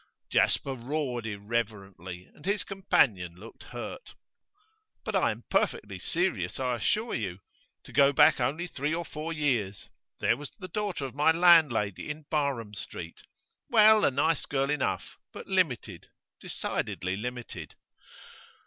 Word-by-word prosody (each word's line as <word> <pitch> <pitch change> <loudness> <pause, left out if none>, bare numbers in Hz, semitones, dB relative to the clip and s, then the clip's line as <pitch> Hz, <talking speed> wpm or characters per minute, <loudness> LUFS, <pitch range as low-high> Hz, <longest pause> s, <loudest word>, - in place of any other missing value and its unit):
Jasper 135 - +2
roared 125 -2 -3
irreverently, 100 -4 -4
and 145 - -18
his 200 +2 0
companion 105 - +1
looked 110 +6 -13
hurt. - - -8 0.9
'But - - -3
I - - +3
am - - -5
perfectly - - 0
serious, 150 - -1
I 125 -2 0
assure 215 - 0
you. 95 -6 -2 0.5
To - - -14
go 140 0 +6
back 140 - +6
only 140 +8 0
three 155 -2 -2
or 170 0 -3
four 155 +2 -5
years. 125 -11 -1 0.3
There - - +2
was 145 -1 -8
the 185 - -7
daughter 205 -9 -2
of 130 - -6
my 145 +4 +3
landlady 160 - +4
in 150 0 -6
Barham 140 -8 -1
Street; 85 -4 -8 0.5
well, 215 -1 +7
a - - +5
nice 145 +4 +1
girl 140 0 0
enough, 150 -3 -2
but - - -9
limited, 125 - -1 0.3
decidedly 95 +1 -3
limited. 120 +3 -6
135 Hz, 140 wpm, -29 LUFS, 105-160 Hz, 0.9 s, well